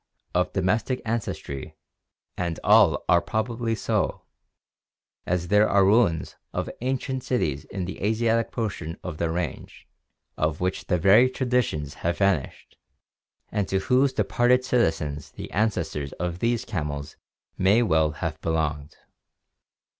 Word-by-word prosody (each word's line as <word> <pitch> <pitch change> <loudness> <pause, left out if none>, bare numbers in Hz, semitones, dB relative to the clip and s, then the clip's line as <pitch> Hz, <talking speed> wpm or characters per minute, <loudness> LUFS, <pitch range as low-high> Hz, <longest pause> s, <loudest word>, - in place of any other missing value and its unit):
e., - - -52
of 90 - 0
domestic 105 +7 0
ancestry, 110 - -4 0.6
and 85 -2 -3
all 105 -5 +5
are 85 - +5
probably 115 +1 -2
so, - - -1 1.0
as 90 -1 -1
there 105 +2 +4
are 100 -1 +4
ruins 100 -6 +2 0.2
of - - -2
ancient 130 0 -2
cities 80 - -1
in 95 -2 -4
the 95 - -7
Asiatic 115 +2 +1
portion 95 -8 -4
of 85 -4 -6
their 85 -1 0
range 90 +2 -5 0.5
of 75 0 0
which 90 +1 -2
the 90 - +2
very 105 +9 +6
tradi 125 -1 +1
tions 75 -7 -5
have 85 0 0
vanished 95 -8 -1 0.7
and 100 -2 -1
to 95 - 0
whose 125 +8 +3
departed 125 -1 +2
citizens 80 - 0
the - - -8
ancestors 90 -9 -1
of 90 0 -4
these 115 +1 0
camels 75 -5 -4 0.4
may 100 +6 +4
well 80 -7 +3
have 75 +1 -5
belonged. 75 -3 -2
95 Hz, 135 wpm, -25 LUFS, 80-115 Hz, 1.0 s, very